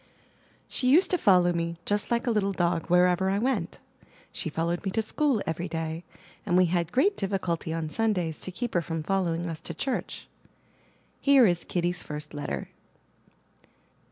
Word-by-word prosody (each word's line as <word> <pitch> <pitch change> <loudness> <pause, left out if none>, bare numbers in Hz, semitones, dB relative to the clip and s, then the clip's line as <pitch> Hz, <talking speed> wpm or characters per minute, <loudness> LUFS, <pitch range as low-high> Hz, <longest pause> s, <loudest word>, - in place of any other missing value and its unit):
She 255 - 0
used 330 +8 +5
to 360 - +3
follow 180 -3 +4
me, 170 0 -2
just 205 0 -1
like 235 0 0
a 240 - +1
little 200 -3 +1
dog 170 -2 0
wherever 180 +1 +3
I 195 - +1
went. 225 -6 -1 0.5
She - - -4
followed 170 +3 -2
me 195 - -1
to 225 +4 0
school 275 -2 0
every 170 +2 -3
day, 165 0 -4 0.4
and 175 - +1
we 185 - +6
had 170 -1 0
great 395 +11 +3
difficulty 185 -5 -2
on 165 -1 -2
Sundays 180 -4 -1
to 185 - -5
keep 240 +6 -4
her 175 - +2
from 165 0 -4
following 175 -2 0
us 165 -2 -5
to 170 - -7
church. 265 - -3 0.9
Here 275 -3 +6
is 175 -4 +1
Kitty's 175 0 -1
first 150 0 -6
letter. 110 - -4
180 Hz, 170 wpm, -27 LUFS, 165-210 Hz, 0.9 s, we